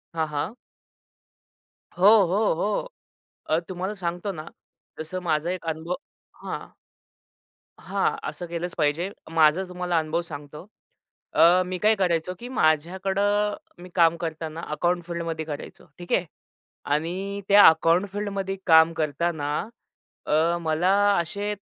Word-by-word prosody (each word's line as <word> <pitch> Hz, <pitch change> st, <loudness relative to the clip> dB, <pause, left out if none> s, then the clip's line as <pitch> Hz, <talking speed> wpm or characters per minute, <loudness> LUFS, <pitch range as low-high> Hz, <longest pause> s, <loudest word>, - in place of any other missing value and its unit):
हां, 160 Hz, -1 st, 0 dB
हां. 150 Hz, +8 st, -3 dB, 1.4 s
हो, 180 Hz, -, +2 dB, 0.2 s
हो, 205 Hz, +5 st, +2 dB
हो. 205 Hz, -, -1 dB, 0.6 s
अ, 155 Hz, -, +3 dB
तुम्हाला 185 Hz, +2 st, -3 dB
सांगतो 175 Hz, +2 st, -3 dB
ना 155 Hz, -4 st, -8 dB, 0.5 s
तसं 160 Hz, +4 st, -4 dB
माझा 160 Hz, -1 st, 0 dB
एक 185 Hz, -2 st, -5 dB
अनुभव 160 Hz, +3 st, -3 dB, 0.5 s
हां. -, -, -6 dB, 1.1 s
हां. -, -, -1 dB
असं 175 Hz, -, -7 dB
केलंच 170 Hz, +1 st, -4 dB
पाहिजे. 160 Hz, +4 st, +1 dB, 0.2 s
माझा 160 Hz, +2 st, +4 dB
तुम्हाला 180 Hz, -1 st, -1 dB
अनुभव 160 Hz, +2 st, -1 dB
सांगतो. 150 Hz, -1 st, -9 dB, 0.7 s
अ, 175 Hz, +2 st, +6 dB
मी 185 Hz, 0 st, -4 dB
काय 215 Hz, +3 st, +4 dB
करायचो, 180 Hz, -3 st, 0 dB
की 245 Hz, -, -8 dB
माझ्याकडे 190 Hz, -, +1 dB, 0.6 s
मी 180 Hz, -, -10 dB
काम 170 Hz, -1 st, +4 dB
करताना 160 Hz, -1 st, -5 dB
अकाउंट 175 Hz, +3 st, 0 dB
फील्डमध्ये 165 Hz, -2 st, -4 dB
करायचो. 150 Hz, -2 st, -8 dB
ठीक 175 Hz, 0 st, -10 dB
आहे 180 Hz, -, +2 dB, 0.7 s
आणि 185 Hz, +6 st, -2 dB
त्या 200 Hz, 0 st, +8 dB
अकाउंट 165 Hz, +4 st, +4 dB
फील्डमध्ये 200 Hz, -2 st, -3 dB
काम 160 Hz, 0 st, +6 dB
करताना 155 Hz, -1 st, -1 dB, 0.8 s
अ, 160 Hz, +3 st, +2 dB
मला 160 Hz, +2 st, +1 dB, 0.3 s
असे 205 Hz, +5 st, -3 dB
170 Hz, 125 wpm, -25 LUFS, 160-185 Hz, 1.4 s, त्या